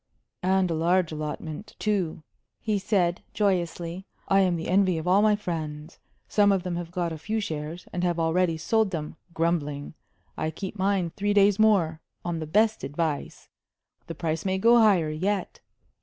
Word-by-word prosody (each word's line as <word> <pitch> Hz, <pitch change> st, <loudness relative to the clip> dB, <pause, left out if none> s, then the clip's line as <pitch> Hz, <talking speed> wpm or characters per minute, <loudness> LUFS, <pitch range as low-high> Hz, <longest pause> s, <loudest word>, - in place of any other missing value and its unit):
"And 185 Hz, -1 st, +2 dB
a -, -, +1 dB
large 170 Hz, +2 st, +2 dB
allotment, 155 Hz, +5 st, -6 dB
too," 190 Hz, -7 st, -1 dB, 0.4 s
he 215 Hz, -3 st, -1 dB
said, 185 Hz, -3 st, +1 dB
joyously. 180 Hz, -2 st, -1 dB, 0.2 s
"I 195 Hz, -, +4 dB
am 185 Hz, -2 st, +3 dB
the 165 Hz, -, -4 dB
envy 185 Hz, -2 st, +3 dB
of 160 Hz, +2 st, -4 dB
all 190 Hz, +3 st, +5 dB
my 210 Hz, 0 st, +4 dB
friends. 160 Hz, -5 st, -5 dB, 0.3 s
Some 205 Hz, -1 st, +4 dB
of 190 Hz, -2 st, +1 dB
them 180 Hz, -2 st, -3 dB
have 175 Hz, -1 st, -4 dB
got 175 Hz, -2 st, -2 dB
a 160 Hz, -, -7 dB
few 215 Hz, +7 st, -2 dB
shares, 160 Hz, -3 st, -5 dB
and 180 Hz, -, -2 dB
have 175 Hz, -1 st, 0 dB
already 165 Hz, +1 st, +1 dB
sold 220 Hz, +5 st, +1 dB
them 155 Hz, -4 st, -5 dB, 0.2 s
grumbling. 150 Hz, -4 st, -1 dB, 0.4 s
I 155 Hz, -, -2 dB
keep 190 Hz, +5 st, -6 dB
mine 190 Hz, -3 st, 0 dB
three 205 Hz, +2 st, -1 dB
days 200 Hz, 0 st, +5 dB
more 180 Hz, -8 st, +3 dB, 0.2 s
on 170 Hz, -1 st, -2 dB
the 155 Hz, -, -5 dB
best 215 Hz, +6 st, +2 dB
advice 150 Hz, 0 st, -3 dB, 0.6 s
the 165 Hz, -, -6 dB
price 160 Hz, -1 st, -2 dB
may 190 Hz, -1 st, 0 dB
go 235 Hz, +4 st, +5 dB
higher 190 Hz, -8 st, +4 dB
yet. 190 Hz, +5 st, -2 dB
180 Hz, 170 wpm, -26 LUFS, 160-200 Hz, 0.6 s, all